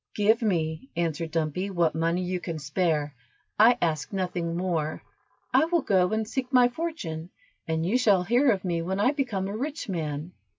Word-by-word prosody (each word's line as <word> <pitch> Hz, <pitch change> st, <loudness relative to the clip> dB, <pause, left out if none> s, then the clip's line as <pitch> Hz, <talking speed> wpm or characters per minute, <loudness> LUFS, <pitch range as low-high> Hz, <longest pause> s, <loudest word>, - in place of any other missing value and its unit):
"Give 220 Hz, +3 st, +3 dB
me," 170 Hz, -, -1 dB
answered 165 Hz, -1 st, -1 dB
Dumpy, 165 Hz, +4 st, -1 dB
"what 170 Hz, -4 st, +1 dB
money 165 Hz, +3 st, 0 dB
you 180 Hz, 0 st, -2 dB
can 170 Hz, -2 st, -5 dB
spare, 150 Hz, -1 st, 0 dB, 0.5 s
I 235 Hz, +3 st, +7 dB
ask 155 Hz, -3 st, -1 dB
nothing 180 Hz, -3 st, -2 dB
more, 165 Hz, -4 st, -2 dB, 0.5 s
I -, -, +5 dB
will 335 Hz, -2 st, +1 dB
go 185 Hz, -2 st, +2 dB
and 220 Hz, 0 st, -1 dB
seek 255 Hz, +2 st, -3 dB
my 250 Hz, -2 st, +5 dB
fortune, 240 Hz, -, -5 dB, 0.4 s
and 160 Hz, 0 st, -1 dB
you 225 Hz, +8 st, +2 dB
shall 205 Hz, -7 st, +4 dB
hear 245 Hz, +8 st, +3 dB
of 195 Hz, -4 st, +1 dB
me 170 Hz, -2 st, 0 dB
when 190 Hz, +3 st, -2 dB
I 245 Hz, +6 st, +4 dB
become 245 Hz, -10 st, -2 dB
a 200 Hz, -, -4 dB
rich 290 Hz, +7 st, -4 dB
man." 155 Hz, -2 st, -3 dB
180 Hz, 180 wpm, -27 LUFS, 165-225 Hz, 0.5 s, I